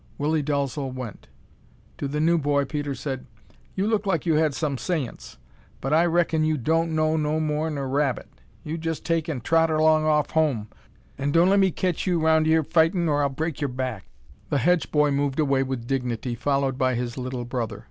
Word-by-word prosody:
Willie 155 +2 +1
Dalzel 140 -1 -2
went. 125 -5 -8 0.7
To 140 - -2
the 150 +2 -3
new 165 +2 +3
boy 145 -1 +1
Peter 145 -1 -3
said: 130 0 -5 0.5
"You 195 - 0
look 215 -2 0
like 170 -5 0
you 165 - +2
had 155 -2 +2
some 150 -4 -1
saince, 145 -3 -4 0.4
but 135 +3 -2
I 165 +3 +4
raikon 165 -2 +2
you 155 0 +1
don't 160 +5 0
know 155 0 +2
no 155 0 0
more'n 155 0 -1
er 135 -1 -3
rabbit. 135 -1 0 0.4
You 160 +2 -4
jest 165 -1 -4
take 165 -1 0
an' 140 -6 -3
trot 165 +6 +3
erlong 155 0 +3
off 150 -1 +2
home, 140 -10 +1 0.5
an' 140 - 0
don' 170 +4 +4
lemme 195 -1 +4
caitch 180 +1 -2
you 175 -2 +2
round 160 0 +3
yere 160 0 +4
er - - -5
fightin' 165 +3 +2
or 145 -1 +2
I'll 140 - +2
break 155 +3 -4
yer 145 - +1
back." 125 -5 -4 0.4
The 145 - +1
Hedge 175 +6 +2
boy 150 -1 +3
moved 140 0 0
away 135 -3 +2
with 130 -3 -3
dignity, 125 -2 -2
followed 135 +1 0
by 130 -2 +2
his 120 0 -3
little 125 -1 -4
brother. 120 -2 -3
150 Hz, 200 wpm, -25 LUFS, 135-160 Hz, 0.7 s, I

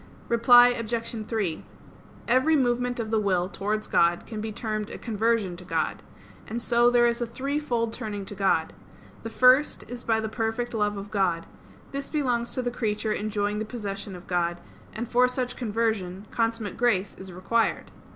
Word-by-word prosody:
Reply 245 +1 +7
Obj. 230 -2 -3
3: 200 -8 -2 0.6
Every 260 +6 +4
movement 245 -2 +1
of 220 -1 -3
the 220 - +3
will 185 -4 +1
towards 210 +2 -2
God 170 0 +2
can 215 -2 -6
be 220 0 -4
termed 215 -1 -3
a - - -7
conversion 220 -4 0
to 180 - -9
God. 180 - -2 0.5
And 230 +2 -3
so 240 +1 +4
there 240 0 +4
is 235 0 +1
a 240 - -1
threefold 255 -2 -2
turning 210 -4 -5
to 205 - -7
God. 195 -1 +1 0.5
The 225 - -5
first 255 +5 +4
is 240 +1 -7
by 225 -1 +2
the 220 - -2
perfect 225 +2 -2
love 210 -2 0
of 200 +1 -7
God; 180 -5 +1 0.5
this 275 0 -4
belongs 245 -6 0
to 255 - -1
the 245 - -1
creature 215 -2 -1
enjoying 210 0 -1
the - - -1
possession 200 -4 -5
of 180 - -11
God; 175 -1 -1 0.3
and 235 +2 -5
for 250 +1 +4
such 250 0 -2
conversion, 215 -5 -2
consummate 225 -3 -1
grace 205 -5 +1
is 190 -1 -9
required. 195 +6 0
225 Hz, 175 wpm, -26 LUFS, 205-240 Hz, 0.6 s, Reply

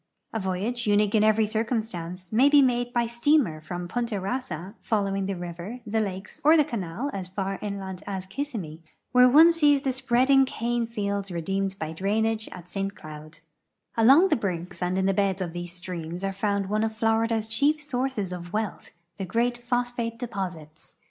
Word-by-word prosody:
A 225 - -1
voyage, 205 +5 -2
uni<pie 205 0 +3
in - - +3
every 215 0 +4
circumstance, 215 -5 -3
may 255 +6 +5
be 290 -1 +7
made 245 -1 +1
by 240 -1 +1
steamer 235 - +2
from 175 +2 -5
Punta 235 +3 -2
Kassa, 195 -3 -4
following 195 -3 0
the 195 - -2
river, 175 +7 -7
the 220 +1 0
lakes, 190 -2 -5
or 310 +3 +7
the 300 - +6
canal 220 +5 -4
as 190 -2 -4
far 195 +1 -3
inland 195 -3 -5
as 190 -2 -4
Ki.ssimmee, 195 - -5 0.3
where 250 0 +7
one 315 +6 +8
sees 295 -4 +4
the 270 -2 0
spreading 260 +1 +4
cane 240 -2 -1
fields 200 -3 -3
redeemed 195 +3 -2
by 155 -3 -4
drainage 220 +5 0
at 180 -1 -10
St. 195 +2 -3
Cloud. 155 +1 -11 0.5
Along 270 +12 +6
the - - +4
brinks 180 -4 -4
and 180 +1 0
in 190 - +1
the 195 - +3
beds 195 -1 +1
of 175 -3 -3
these 175 0 -5
streams 175 -1 -6
are 195 0 -1
found 200 0 -1
one 215 +2 0
of 220 0 -2
Florida's 225 0 +1
chief 285 +8 +2
sources 260 -8 -2
of 175 -1 -7
wealth, 215 -1 -3 0.3
the 195 - -3
great 235 +6 +1
phosphate 240 -1 -2
de 245 - -4
j)Osits. 175 -7 -7
210 Hz, 180 wpm, -26 LUFS, 185-240 Hz, 0.5 s, one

